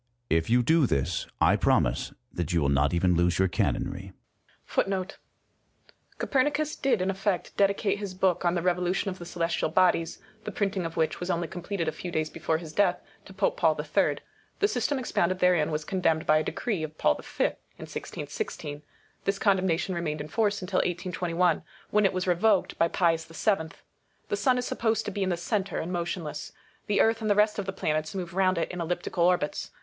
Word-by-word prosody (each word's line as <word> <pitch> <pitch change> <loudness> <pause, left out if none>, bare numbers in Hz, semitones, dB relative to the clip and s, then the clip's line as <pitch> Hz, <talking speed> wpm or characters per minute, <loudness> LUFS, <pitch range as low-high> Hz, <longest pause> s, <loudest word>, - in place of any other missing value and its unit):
If 80 +3 +2
you 120 +1 +4
do 160 +1 +4
this, 70 +2 -1
I - - +5
promise - - +2 0.2
that 85 -1 -2
you 85 - +2
will 70 - +2
not 70 +1 +3
even 90 +1 +2
lose 85 0 +2
your 95 - +3
canonry. 95 +2 -2 0.6
^ 190 -1 0 1.0
Copernicus 295 +3 +1
did 240 -8 +1
in 190 - +1
effect 195 -1 -2
dedi 200 0 +3
cate 205 -1 0
his 200 -3 -5
book 185 -2 +1
on 175 0 +2
the 170 - -1
"Revolution 180 +2 +1
of 185 - -9
the 175 - -8
Celestial 170 -2 -1
Bodies," 165 0 +2 0.3
the - - -5
printing 195 -4 -1
of 165 - -10
which 160 -1 0
was 175 - -4
only 170 -1 0
completed 175 0 -4
a - - +1
few 175 +3 -7
days 155 -2 -1
before 160 0 -1
his 160 -1 -9
death, 190 0 +2 0.3
to - - -12
Pope 195 0 +1
Paul 160 -3 +2
III. 150 0 +1 0.4
The 410 - +3
system 265 - 0
expounded 185 -8 0
therein 180 -4 +3
was 155 -1 -2
condemned 165 -4 +1
by 155 0 +5
a - - -1
decree 210 -2 -2
of 155 0 -6
Paul - - +3
v. - - 0 0.3
in - - -8
i6i6. 145 0 -5 0.4
This 195 0 +1
condemnation 190 -3 +1
remained 160 -3 -2
in 150 +1 -6
force 205 0 0
until 185 0 -2
1 - - +2
821, 180 -1 0 0.3
when 210 0 +4
it 195 - +4
was 185 0 -1
revoked 190 +3 +2
by 165 - +5
Pius 165 -2 +1
VII. 165 0 0 0.6
The 415 - +1
sun 260 -9 +2
is 250 - -1
supposed 220 -1 0
to - - -3
be 200 - -4
in 190 - +1
the 175 - 0
centre, 195 +3 -2
and 170 - -3
motionless; 170 -3 -4 0.3
the 205 - +3
earth 225 +1 +2
and 215 - -1
the 205 - +4
rest 210 0 +3
of 200 - -3
the - - -1
planets 155 -1 -2
move 180 -2 -4
round 185 -1 +2
it 165 - -1
in 180 -1 -4
elliptical 175 +1 -1
orbits. 175 -4 +1
180 Hz, 205 wpm, -27 LUFS, 160-195 Hz, 1.0 s, I